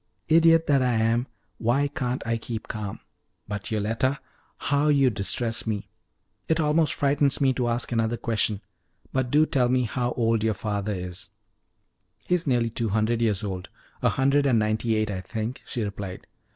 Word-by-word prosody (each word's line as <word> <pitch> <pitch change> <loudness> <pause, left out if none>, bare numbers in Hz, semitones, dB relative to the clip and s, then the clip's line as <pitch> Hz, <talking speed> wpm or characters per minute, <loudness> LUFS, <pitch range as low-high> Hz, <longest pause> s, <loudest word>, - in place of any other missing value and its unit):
Idiot 165 0 +6
that 140 -2 +3
I 125 -1 +2
am, 115 +3 +1 0.3
why 125 +5 +2
can't 125 -3 -3
I 115 0 0
keep 115 0 -6
calm! 105 -2 -5 0.5
But, 105 -1 -5
Yoletta, 115 +6 0 0.4
how 145 +1 +1
you 140 -4 +4
distress 110 +3 -1
me! 105 -2 -3 0.6
It 160 0 +1
almost 155 0 +2
frightens 140 0 +2
me 135 -2 +3
to 125 -1 -1
ask 120 +1 -1
another 115 0 0
question, 110 -3 0 0.5
but 130 -2 0
do 150 +4 +4
tell 125 -5 +1
me 125 0 +2
how 120 +1 -1
old 115 -2 +1
your 110 -1 +1
father 105 0 -2
is?" 90 -1 -5 1.0
"He - - 0
is 170 -3 +1
nearly 120 -3 +2
two 115 0 -2
hundred 110 +3 +1
years 110 -3 +1
old 95 -2 -4 0.3
a - - +3
hundred 140 +2 +2
and 125 -4 +4
ninety 110 +1 +1
eight, 110 -1 0
I 95 -2 -3
think," 110 +5 -4
she 120 - -3
replied. 100 -2 -6
115 Hz, 175 wpm, -26 LUFS, 110-135 Hz, 1.0 s, Idiot